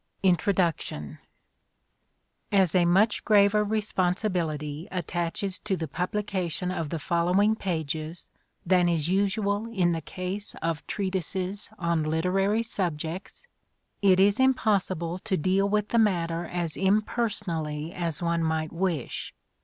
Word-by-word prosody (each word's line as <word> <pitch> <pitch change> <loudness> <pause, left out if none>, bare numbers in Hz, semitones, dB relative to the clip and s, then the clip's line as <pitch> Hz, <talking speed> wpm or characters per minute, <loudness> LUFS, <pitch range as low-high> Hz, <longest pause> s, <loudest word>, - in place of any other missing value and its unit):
12 190 - +6
INTRODUCTION 165 - -1 1.3
As 190 -5 +4
a 180 -2 +4
much 195 +6 +3
graver 210 0 +5
responsibility 180 -7 -1
attaches 180 +2 -2
to 195 -3 -2
the 160 - -3
publication 180 0 -2
of 165 -4 -3
the 165 - -2
following 180 +7 +2
pages 160 -4 -3 0.4
than 180 -1 +4
is 165 -2 0
usual 205 +2 +1
in 180 -6 +2
the 165 -1 -1
case 185 +5 -5
of 165 -1 -2
treatises 190 0 -2
on 170 -2 0
literary 185 +8 +1
subjects, 180 - -4 0.6
it 190 -2 +5
is 200 +3 +4
impossible 195 -9 +1
to 195 -1 -1
deal 190 +5 +2
with 210 0 +1
the 235 - +3
matter 170 -5 +1
as 170 -2 -3
impersonally 190 -7 -1
as 170 -1 -3
one 170 0 +1
might 160 -1 -1
wish. 170 -6 -2
180 Hz, 120 wpm, -27 LUFS, 165-200 Hz, 1.3 s, 12